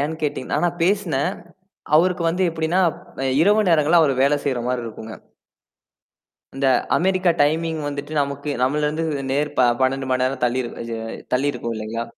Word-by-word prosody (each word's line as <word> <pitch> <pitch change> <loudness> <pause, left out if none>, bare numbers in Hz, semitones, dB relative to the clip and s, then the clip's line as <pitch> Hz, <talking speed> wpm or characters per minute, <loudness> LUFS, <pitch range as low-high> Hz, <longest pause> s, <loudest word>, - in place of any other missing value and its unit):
ஏன்ன்னு 155 +3 -3
கேட்டீங்கன்னா 145 -3 -2
ஆனா 175 -1 +2
பேசினேன். 180 -5 +1 0.7
அவருக்கு 175 +1 +2
வந்து 180 +3 0
எப்பிடின்னா, 160 +2 0 0.4
அ - - -1 0.2
இரவு 205 +2 +3
நேரங்கள்ல 165 +1 +4
அவரு 145 -4 +3
வேலை 145 +1 +3
செய்றமாரி 125 -2 -1
இருக்கும்ங்க. 110 0 -8 1.4
இந்த 135 0 +1 0.3
அமெரிக்கா 185 0 +2
டைமிங் 160 +2 +1
வந்துட்டு 145 +1 -6
நமக்கு 140 +1 -3
நம்மள்ல 150 +3 +1
இருந்து 155 +2 -2 0.3
நேர் 145 +2 0
ப - - +5 0.2
12 135 +1 0
மணி 130 - +1
நேரம் 130 0 -2
தள்ளிரு 120 0 -1
அ - - -7 0.5
தள்ளிருக்கும் 130 -3 -1
இல்லேங்களா! 110 +1 -4
145 Hz, 150 wpm, -21 LUFS, 130-165 Hz, 1.4 s, ப